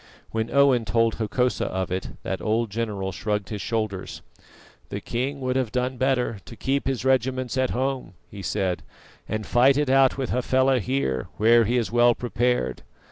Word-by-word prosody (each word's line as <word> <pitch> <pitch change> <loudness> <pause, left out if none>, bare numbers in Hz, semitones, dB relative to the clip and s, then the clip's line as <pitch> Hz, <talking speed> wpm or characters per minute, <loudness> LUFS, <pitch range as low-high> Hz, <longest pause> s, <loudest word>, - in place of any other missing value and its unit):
When 110 0 -2
Owen 140 -4 +4
told 115 +1 +2
Hokosa 120 +3 0
of 95 -1 -3
it, 95 +1 -2
that - - -3
old 110 0 0
general 105 -3 -2
shrugged 105 +1 -2
his 105 -2 -4
shoulders. 110 -4 -3 0.7
"The - - -4
king 135 +4 -3
would 130 0 -1
have 130 -5 0
done 125 0 -1
better 125 -4 0
to 115 - -11
keep 135 +5 -1
his 130 -1 -2
regiments 130 -1 +1
at 130 -1 +1
home," 130 -7 -2
he 100 - -9
said, 95 -2 -1 0.5
"and 110 -1 -2
fight 130 +3 +4
it 145 -3 +1
out 135 0 +4
with 130 -3 -2
Hafela 130 +1 +2
here, 115 - -1
where 115 +2 +5
he 120 +4 +1
is 115 -3 -1
well 120 0 +5
prepared. 120 - -1
120 Hz, 175 wpm, -25 LUFS, 110-130 Hz, 0.7 s, where